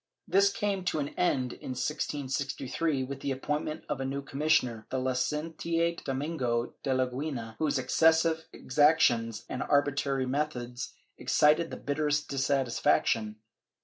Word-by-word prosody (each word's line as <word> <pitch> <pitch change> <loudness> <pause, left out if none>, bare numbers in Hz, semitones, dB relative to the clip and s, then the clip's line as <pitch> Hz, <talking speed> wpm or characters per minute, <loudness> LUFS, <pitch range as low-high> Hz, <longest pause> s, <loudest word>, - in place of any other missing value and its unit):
^ - - -62 0.3
This 200 +1 +5
came 200 -2 -1
to 160 - 0
an 145 -1 -1
end, 130 -8 0
in 130 - -6
1663, 140 +1 -2
with 135 +1 -6
the 140 - -3
appointment 150 +3 -2
of 135 - -2
a - - -1
new 140 +1 -3
commissioner, 135 -6 +1
the 130 - -2
Licentiate 160 +6 -1
Domingo 130 -4 -1
de - - -4
Leguina, 130 -2 -2
whose 150 -3 +1
exces 160 +5 +4
sive 160 -1 -1
exactions 130 -6 +2
and 130 - -4
arbitrary 140 -1 +1
methods 125 -3 -3 0.2
excited 155 +3 +3
the - - -6
bitterest 150 +1 0
dissatis 135 -2 0
faction. 110 -1 +2
140 Hz, 140 wpm, -29 LUFS, 130-155 Hz, 0.3 s, This